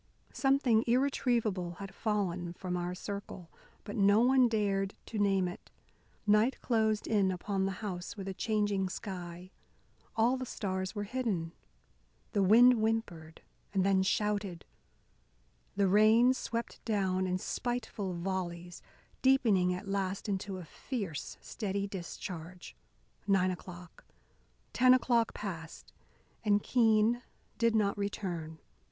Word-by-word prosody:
Something 270 -5 +3
irretrievable 235 -8 +1
had 195 +2 -9
fallen 185 -6 -2
from 180 0 -4
our 175 0 -2
circle. 200 -3 -7 0.3
But 205 - -7
no 200 0 +5
one 255 0 +5
dared 200 -3 0
to 220 - -5
name 195 -2 +2
it. 180 - -9 0.6
Night 215 +5 +3
closed 220 -3 +1
in 200 -3 +2
upon 190 +1 -1
the - - -1
house 180 +1 -5
with 195 -1 -6
a 195 - -3
changing 205 -2 0
sky. 180 -2 -7 0.6
All 235 +4 +3
the 255 - -4
stars 190 -2 -3
were 205 - -2
hidden. 205 -8 -2 0.8
The 200 - +1
wind 235 +6 +7
whimpered 200 -8 -2 0.3
and 190 -1 +3
then 195 -1 +3
shouted. 200 -2 -1 1.1
The 200 -1 +3
rain 220 +6 +5
swept 235 -2 -5
down 190 -4 0
in 180 0 0
spiteful 220 -3 -3
volleys, 175 -1 -4 0.4
deepening 225 -9 +4
at 185 +3 -4
last 195 +1 -2
into 195 -1 -3
a 180 - -8
fierce, 185 - -5
steady 200 -2 -3
discharge. 180 -2 -7 0.5
Nine 190 -2 +3
o'clock, 180 -1 -10 0.7
ten 255 0 +6
o'clock 240 -3 +1
passed, 165 -6 -7 0.5
and 205 -1 +2
Keene 225 0 +3 0.4
did 230 -1 +3
not 205 -2 +2
return. 175 -6 -4
200 Hz, 125 wpm, -32 LUFS, 185-220 Hz, 1.1 s, wind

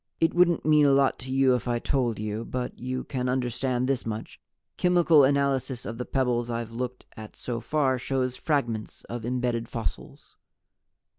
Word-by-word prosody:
"It 165 0 +2
wouldn't 175 -1 +3
mean 150 -1 +5
a 140 - +5
lot 135 0 +3
to 130 0 -7
you 135 -1 +4
if 125 0 -1
I 120 -1 +1
told 120 -3 0
you. 105 +1 -3
But 125 +1 -4
you 130 +1 -3
can 125 -2 -3
understand 125 0 0
this 135 -2 0
much 110 0 -6 0.3
chemical 175 -4 +5
analysis 135 -2 +1
of 115 +1 -6
the 125 - -3
pebbles 120 -3 0
I've 115 -1 -3
looked 125 +1 -5
at 110 -1 -10
so 120 -2 -4
far 130 +1 +1
shows 130 0 -1
fragments 120 -7 -2
of 120 -1 -6
embedded 120 -2 -1
fossils." 115 -2 -6
125 Hz, 170 wpm, -27 LUFS, 120-135 Hz, 0.3 s, mean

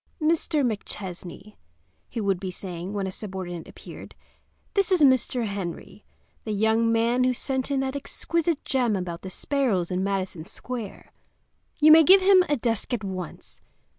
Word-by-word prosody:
"Mr. 310 -2 +1
McChesney," 200 -2 -6 0.5
he 235 - -5
would 195 -4 0
be 190 - -4
saying 180 0 -6
when 200 -2 -2
a 190 - -3
subordinate 185 -4 -6
appeared, - - -11 0.6
"this 395 -2 +1
is 365 -3 +3
Mr. 260 -3 +3
Henry, 200 0 -6 0.4
the 215 - -3
young 220 +2 +2
man 235 +2 +2
who 255 0 +2
sent 265 +1 -2
in 275 -1 +1
that 265 +1 -3
exquisite 330 +3 -2
gem 245 -5 +1
about 180 -2 -4
the 190 - -7
sparrows 210 -6 -1
in 185 +1 0
Madison 190 -4 -2
Square. 230 +3 -7 0.7
You 310 +1 +7
may 320 +1 +10
give 380 +5 +7
him 375 -1 +6
a 290 - +2
desk 230 0 -2
at 215 - -7
once. 185 -3 -7
225 Hz, 160 wpm, -25 LUFS, 190-270 Hz, 0.7 s, may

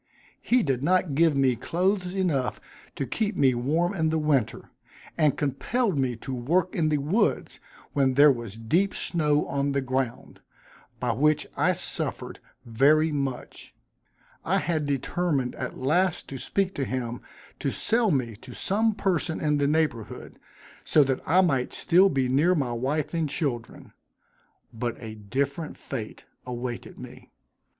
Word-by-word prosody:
He 245 -1 +2
did 135 -4 0
not 180 0 +2
give 160 +1 +3
me 130 -2 +3
clothes 180 - -1
enough 160 -10 0 0.4
to 140 - -2
keep 215 - -2
me 135 -5 +4
warm 155 +10 0
in 160 -4 0
winter, 140 -7 0 0.4
and 155 -4 +2
compelled 200 - 0
me 130 -3 0
to 130 +4 -7
work 165 +9 0
in 155 -2 +1
the 150 - +2
woods, 155 +11 0 0.3
when 135 -2 +2
there 145 +1 +7
was 115 -5 -5
deep 170 - +1
snow 150 -3 +1
on 140 0 -1
the 140 - +1
ground, 130 -2 -3 0.6
by 125 -1 0
which 150 +3 +2
I - - +2
suffered - - -4 0.3
very 145 +7 +3
much. 140 -3 -5 0.7
I - - +1
had 155 -4 -1
determined 140 -1 -1
at 130 - -5
last 175 +7 +1
to 135 - -6
speak 195 +5 -1
to 140 - -2
him 120 -2 -3 0.4
to - - -1
sell 230 0 +1
me 125 - 0
to 125 +2 -12
some 220 +2 +1
person 175 -5 0
in 150 -1 +1
the 140 - +2
neighborhood, 150 -7 -2 0.4
so 150 - +5
that 135 -1 -1
I 180 +5 +5
might 135 -9 0
still 185 +3 +4
be 135 -4 0
near 150 +8 +3
my 135 -6 -1
wife 135 +7 -2
and 165 -3 0
children 135 -7 -4 0.8
but 120 0 -3
a 110 -2 -7
different 140 +9 -3
fate 115 -6 -7 0.2
awaited 120 -1 -5
me. - - -11
145 Hz, 150 wpm, -26 LUFS, 130-170 Hz, 0.8 s, there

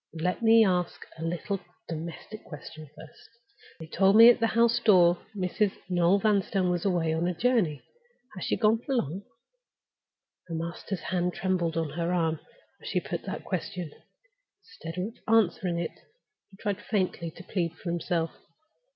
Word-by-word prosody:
Let 180 +6 -1
me 225 -1 +6
ask 180 -3 -1
a - - -5
little 175 +4 -2 0.3
domestic 170 +6 -7
question 155 0 -10
first. 160 - -14 0.5
They 160 - -7
told 190 +5 +3
me 230 +2 +10
at 245 - -1
the 230 - +3
house 235 +1 +3
door 180 -6 +5 0.2
Mrs. 195 +1 0 0.2
Noel 175 +1 +3
Vanstone 195 -3 +1
was 175 +1 -2
gone 195 - +3
away 165 -2 +1
on 165 +2 0
a 180 - -1
journey. 185 - +1 0.5
Has 185 - -7
she - - 0
gone 220 0 +3
for 270 +3 -3
long?" 185 - -1 1.3
Her 165 - -5
master's 170 +3 -4
hand 180 0 -1
trembled 175 -4 0
on 160 -3 -1
her 170 +3 -2
arm 165 -3 0 0.4
as - - -10
she - - 0
put - - -5
that - - -5
question. 175 -4 -4 0.7
Instead 175 - -9
of 205 +5 -3
answering 185 -5 +2
it, 170 -1 -4 0.5
he 195 - -18
tried 205 -1 -2
faintly 185 -6 -1
to 170 +3 -12
plead 175 -3 -2
for 170 +1 -5
himself. 170 -1 -1
180 Hz, 165 wpm, -28 LUFS, 165-205 Hz, 1.3 s, me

